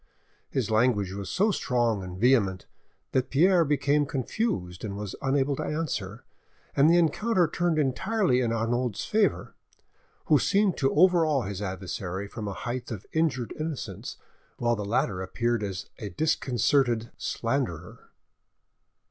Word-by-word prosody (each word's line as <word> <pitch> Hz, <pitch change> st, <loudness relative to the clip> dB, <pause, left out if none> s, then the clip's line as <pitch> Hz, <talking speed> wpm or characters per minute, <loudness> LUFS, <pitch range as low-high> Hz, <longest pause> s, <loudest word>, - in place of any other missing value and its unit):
His 120 Hz, -5 st, -1 dB
language 110 Hz, -4 st, +2 dB
was 100 Hz, 0 st, -5 dB
so 210 Hz, +4 st, +2 dB
strong 120 Hz, -, 0 dB
and 90 Hz, -1 st, -7 dB
vehement, 100 Hz, -5 st, +2 dB, 0.5 s
that 130 Hz, -1 st, 0 dB
Pierre 175 Hz, +5 st, +4 dB
became 145 Hz, -1 st, +1 dB
confused 130 Hz, -, -2 dB
and 100 Hz, -2 st, -4 dB
was 105 Hz, -2 st, -5 dB
unable 135 Hz, +1 st, +1 dB
to -, -, -2 dB
answer, 125 Hz, -9 st, -3 dB, 0.5 s
and 140 Hz, +3 st, +5 dB
the 170 Hz, -, +5 dB
encounter 175 Hz, +3 st, +2 dB
turned 175 Hz, +1 st, 0 dB
entirely 155 Hz, -, +1 dB
in 120 Hz, -2 st, 0 dB
Arnauld's 115 Hz, 0 st, -1 dB
favour, 215 Hz, -1 st, +1 dB, 0.7 s
who -, -, +4 dB
seemed 200 Hz, -2 st, +2 dB
to 135 Hz, -1 st, +2 dB
overawe 160 Hz, -4 st, +4 dB
his 100 Hz, -1 st, -5 dB
adversary 95 Hz, 0 st, -4 dB
from 105 Hz, 0 st, -6 dB
a 100 Hz, -, -3 dB
height 120 Hz, +5 st, -5 dB
of 105 Hz, -4 st, -6 dB
injured 155 Hz, -7 st, 0 dB
innocence, 155 Hz, -3 st, -5 dB, 0.4 s
while 120 Hz, 0 st, +1 dB
the 105 Hz, -, -4 dB
latter 100 Hz, -3 st, 0 dB
appeared 115 Hz, +5 st, -1 dB
as 95 Hz, -3 st, -4 dB
a 105 Hz, -, -5 dB
disconcerted 120 Hz, -, +1 dB
slanderer. 115 Hz, -, -3 dB
125 Hz, 140 wpm, -27 LUFS, 105-155 Hz, 0.7 s, and